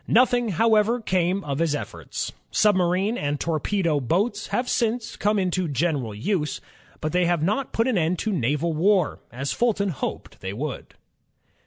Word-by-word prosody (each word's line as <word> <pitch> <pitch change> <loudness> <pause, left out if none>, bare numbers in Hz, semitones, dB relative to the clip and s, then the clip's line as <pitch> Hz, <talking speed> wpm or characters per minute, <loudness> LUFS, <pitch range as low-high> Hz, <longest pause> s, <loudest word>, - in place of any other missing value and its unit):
Nothing, 245 -1 +4
however, 220 +4 +3
came 185 -2 0
of 140 0 -3
his 165 -3 +1
efforts. - - -5 0.2
Submarine 195 +2 +2
and 145 0 -1
torpedo 165 0 0
boats 205 - 0
have 245 0 -1
since 230 -1 0
come 210 +1 +1
into 185 -2 0
general 140 -6 -1
use, 150 - -1 0.4
but 155 - -1
they 180 +1 +2
have 170 -3 +1
not 215 +10 0
put 230 +2 +1
an 235 -8 +2
end 165 +2 +1
to 215 +5 -1
naval 150 +2 0
war, 185 +1 +2
as 135 +3 -3
Fulton 205 -4 +1
hoped 140 -11 -5
they 95 +1 -4
would. 140 +6 -5
180 Hz, 160 wpm, -24 LUFS, 150-210 Hz, 0.4 s, Nothing